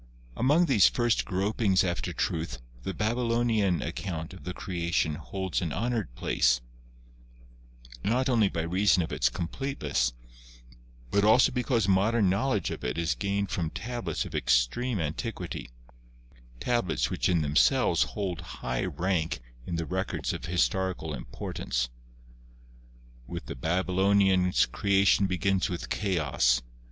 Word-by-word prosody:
Among 150 +8 +3
these 125 - +5
first 120 -2 +1
gropings 100 0 +1
after 85 -2 -2
truth 80 -7 -2 0.2
the 95 - -3
Babylonian 115 -4 +1
account 85 0 -5
of 95 - -12
the 90 - -4
Creation 85 -3 -1
holds 95 +5 -3
an 85 -4 -2
honored 110 - -2
place, - - +2 1.4
not 125 +5 +1
only 115 -6 +3
by 80 - -2
reason 90 +1 +3
of - - -6
its 60 - +2
completeness, 85 - -2 1.0
but 100 - +3
also 110 +4 +5
because 125 -4 0
modern 100 +1 +3
knowledge 105 - 0
of - - -6
it 60 +3 -2
is 85 -1 +1
gained 100 0 -2
from 85 -3 -1
tablets 95 0 -3
of - - -9
extreme 100 - +1
anti 80 +9 -2
quity, 90 - -7 0.9
tablets 120 -7 0
which - - 0
in 85 -3 +2
themselves 70 -4 +3 0.2
hold 95 -5 -2
high 60 -1 -3
rank 85 +1 -1 0.3
in 85 - -2
the 85 - -1
2 - - -5
GEOLOGY - - -5
records 90 -8 -2
of - - -6
historical 90 -2 0
importance. - - -3 1.4
With - - -6
the - - -6
Babylonians 95 +2 +2
Creation 100 0 +3
begins 95 +2 +1
with 90 -2 -5
Chaos. 70 - +1
95 Hz, 135 wpm, -28 LUFS, 80-105 Hz, 1.4 s, these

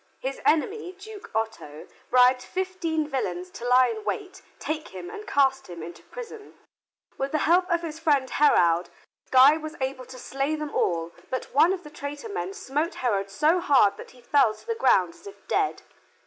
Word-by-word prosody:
His 270 +1 -4
enemy, 365 +4 +1
Duke 410 +2 -11
Otto, 220 -9 -4 0.2
bribed 250 0 +5
fifteen 345 -3 -2
villains 185 -10 -3
to 240 - -6
lie 250 +1 +6
in 435 -1 -5
wait, 385 -3 -4 0.2
take 310 0 -4
him 180 -2 -9
and 425 - -9
cast 270 -1 +2
him 170 -2 -8
into 170 +1 -9
prison. 455 -3 -10 0.6
With 270 0 -2
the - - +3
help 360 +3 +3
of 340 -1 +1
his 320 -1 -6
friend 290 -5 +2
Heraud, 175 - +3 0.4
Guy 265 +4 +7
was 310 0 -7
able 260 -1 -3
to 260 0 -11
slay 275 +4 -2
them 300 -1 -5
all, 165 -1 0 0.2
but 255 - -4
one 315 +6 +5
of 375 -1 -3
the 300 - -11
traitor 290 +7 -7
men 400 -1 -4
smote 320 -4 -2
Heraud 200 -6 -1
so 305 - +2
hard 265 - +4
that - - -10
he 250 - -18
fell 265 -5 +3
to - - -18
the 460 - -1
ground 185 - +3
as - - -15
if 200 0 -13
dead. 400 -2 0
285 Hz, 190 wpm, -26 LUFS, 245-350 Hz, 0.6 s, Guy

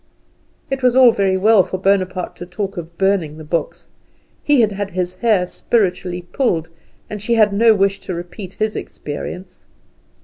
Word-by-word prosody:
It 270 0 -2
was 250 -1 +3
all 255 -2 +7
very 195 -3 +1
well 210 +1 +5
for 185 - -4
Bonaparte 185 -1 0
to 175 - -8
talk 195 +2 -4
of 170 -1 -8
burning 190 -6 0
the 155 - -9
books. 165 +2 -3 0.6
He 290 -4 +4
had 215 -2 +2
had 200 0 -4
his 180 0 -3
hair 215 -6 +2
spiritually 180 -3 -1
pulled, 175 - -1 0.4
and 210 -1 -7
she 235 +3 0
had 215 -3 +4
no 225 +2 +5
wish 195 0 +1
to 185 - -6
repeat 175 +2 -8
his 215 0 -1
experience. 180 +5 -7
195 Hz, 170 wpm, -19 LUFS, 180-215 Hz, 0.6 s, all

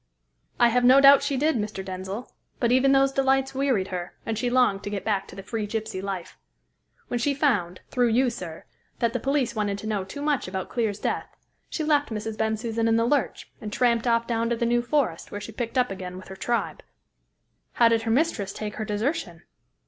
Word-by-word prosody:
"I 240 - +6
have 245 +1 +2
no 255 +2 +7
doubt 275 0 +8
she 280 -1 -1
did, 300 0 +2
Mr. 210 -3 -4
Denzil, 190 +5 -5 0.3
but 235 -1 +2
even 260 +2 +4
those 270 0 +4
delights 270 0 +1
wearied 260 -8 0
her, 180 -2 -5
and 225 - -2
she 245 +3 -1
longed 245 -6 +3
to - - -4
get 200 -1 -4
back 200 -3 0
to - - -12
the 195 - -8
free 215 +1 -3
gypsy 220 -2 -4
life. 190 -3 -6 0.7
When 245 - -1
she 280 +4 +1
found 205 - 0
through 245 -2 +2
you, 245 +2 +3
sir 175 -8 -8 0.3
that 235 -1 0
the 245 - -1
police 270 -2 0
wanted 205 -3 -1
to 205 - -8
know 210 -3 -1
too 240 +10 -7
much 290 -7 0
about 190 0 -4
Clear's 220 -4 -1
death, - - -2 0.4
she 315 - -3
left 295 -1 +2
Mrs. 220 0 -4
Bensusan 220 +1 -1
in 225 - +3
the 230 0 +2
lurch, 280 +1 -1
and 210 -2 -5
tramped 235 +1 +2
off 230 0 +2
down 230 -1 0
to 235 - +1
the 235 - -1
New 240 +1 +2
Forest, 240 - -1
where 205 - -4
she 210 +2 -8
picked 235 +3 -4
up 250 -4 +2
again 185 -1 -6
with 185 - -11
her 190 - -7
tribe." 235 +4 -2 0.9
"How 235 - +5
did 230 -1 +3
her 225 - -3
mistress 225 -7 +1
take 210 -1 -6
her 220 - -3
desertion?" 210 - -2
230 Hz, 215 wpm, -25 LUFS, 205-255 Hz, 0.9 s, doubt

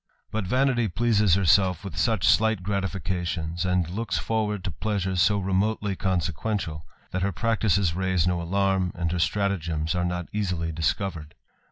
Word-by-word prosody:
But 105 -3 -2
vanity 125 0 +2
pleases 105 -2 +2
lerself 95 0 +3
with 100 - -7
such 110 -7 +1
slight 105 -1 +3
gratifications, 90 -3 -2
and 90 -2 +1
looks 110 +7 -2
forward 105 -3 -1
to 90 - -3
pleasure 95 +2 -2
so 90 +4 +3
remotely 100 +1 0
consequential, 90 -3 -2 0.2
that 95 - -2
her 100 +1 +1
practices 100 -2 +1
raise 95 -1 +1
10 90 - +2
alarm, 95 +1 0
and 85 -1 -1
her 90 - -1
statagems 80 -3 0
are 90 - 0
not 90 -1 -3
easily 90 -6 -1
discovered. 80 0 -2
95 Hz, 150 wpm, -26 LUFS, 85-105 Hz, 0.2 s, lerself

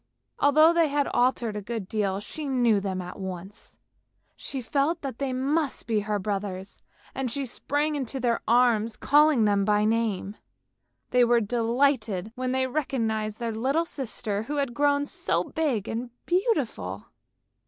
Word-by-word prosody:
Although 310 +3 +6
they 335 -2 +4
had 285 0 0
altered 245 -3 +1
a 210 - -3
good 220 -2 -5
deal, 200 -2 -1
she 300 +9 -7
knew 240 -6 +3
them 190 -2 -3
at 180 +3 -9
once; 190 +2 -8 0.6
she 270 - -5
felt 285 +7 0
that 270 -4 -6
they 275 -2 -1
must 275 +3 -1
be 225 -2 +1
her 210 0 -1
brothers 195 -1 -4 0.3
and 265 -2 -2
she 275 +4 -3
sprang 290 +5 -1
into 270 -2 -3
their 240 -2 0
arms, 230 -2 +3
calling 295 -5 +4
them 200 -1 +2
by 210 +1 +2
name. 215 -2 -1 0.7
They 250 0 +5
were 240 0 +4
delighted 230 -2 0
when 255 0 -2
they 260 0 +1
recognised 225 -6 -2
their 230 -1 -3
little 270 +9 0
sister 220 -8 -3
who 285 +7 -4
had 275 -4 -1
grown 285 +2 +2
so - - -1
big 270 - -1
and 235 +2 -3 0.2
beautiful. 270 - -1
240 Hz, 155 wpm, -26 LUFS, 210-280 Hz, 0.7 s, Although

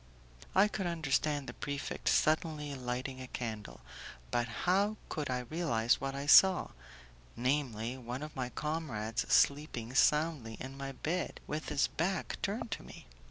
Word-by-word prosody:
I 195 +2 +6
could 195 -3 -3
understand 150 -3 0
the - - -7
prefect 140 -1 -3
suddenly 155 -2 +2
lighting 130 0 -4
a 130 - -7
candle, 110 -5 -5 0.5
but 120 0 +1 0.2
how 200 +4 +3
could 150 -3 -3
I 125 -1 0
realize 125 -4 +1
what 135 0 -2
I 140 +1 -3
saw 185 +5 +7 0.7
namely, 125 -2 -1
one 125 +3 -5
of 155 - -8
my 125 -2 -2
comrades 140 -8 -2
sleeping 140 -5 +2
soundly 150 -5 +2
in 135 +1 -7
my 135 0 -5
bed, 170 +6 -2
with 155 +1 -4
his 150 -1 +3
back 185 +4 -2
turned 215 +3 -2
to - - -3
me? - - -12
140 Hz, 150 wpm, -33 LUFS, 125-160 Hz, 0.7 s, saw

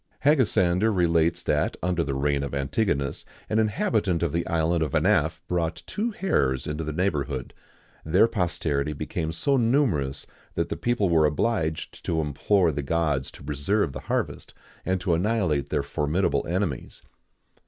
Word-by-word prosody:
Hegesander 110 - +3
relates 85 -3 +2
that, - - 0
under 90 -2 +1
the 70 -3 -3
reign 70 +1 +1
of 70 0 -4
Antigonus, 70 0 -1 0.3
an 110 - +3
inhabitant 105 -4 +1
of 85 - -1
the 85 0 -1
island 85 +1 +1
of 75 -3 -1
Anaphe 80 +2 +2
brought 85 -2 -1
two 220 +3 -2
hares 70 - 0
into 75 +2 -3
the 75 - -3
neighbourhood. 75 -7 -2 0.5
Their 90 +8 +4
posterity 80 -8 -1
became 80 +2 -3
so 135 - +1
numerous 115 - +1 0.3
that - - -1
the - - -2
people 120 -4 0
were 80 -3 +4
obliged 80 -1 -1
to 80 - 0
implore 80 +5 +2
the 75 - -3
gods 75 -2 0
to - - -13
preserve 75 +4 0
the - - -5
harvest, - - -2 0.3
and 95 0 +1
to 90 -1 +1
annihilate 90 - +1
their - - 0
formidable 75 +6 0
enemies. 85 -6 -3
85 Hz, 155 wpm, -26 LUFS, 75-100 Hz, 0.5 s, Their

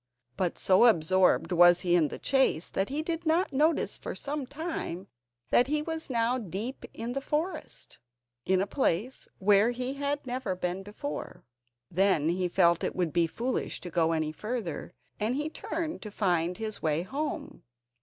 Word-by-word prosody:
But 185 -3 -1
so 190 +5 +5
absorbed 185 -3 +4
was 175 0 +6
he 175 -2 +2
in 165 -4 +4
the - - -7
chase 265 - +1
that 195 - -1
he 295 +3 -2
did 330 +1 -3
not 325 0 +1
notice 305 +4 +1
for - - -5
some 285 -2 -4
time 285 - -4 0.5
that 245 - +5
he 300 +1 0
was 320 -1 -4
now 240 +1 +1
deep 215 +5 -5
in 235 +2 -5
the 275 - -2
forest, 315 +4 -4 0.4
in 185 0 +2
a - - -1
place 230 - -1
where 205 +3 +4
he 250 +2 -2
had 285 +1 -2
never 245 -6 -2
been 180 +1 -2
before. 190 -8 -6 0.5
Then 180 -4 +3
he 180 +1 0
felt 170 -1 +3
it - - -1
would 175 -4 -1
be 170 -1 +3
foolish 245 +9 -2
to 175 - -7
go 165 -1 +2
any 155 -1 0
further, 195 -3 -5 0.2
and 220 +4 0
he 300 +2 -1
turned 320 +1 -4
to 215 - -6
find 180 -4 0
his 215 -2 -4
way 155 +1 +1
home. 290 +8 -4
210 Hz, 175 wpm, -29 LUFS, 175-275 Hz, 0.5 s, was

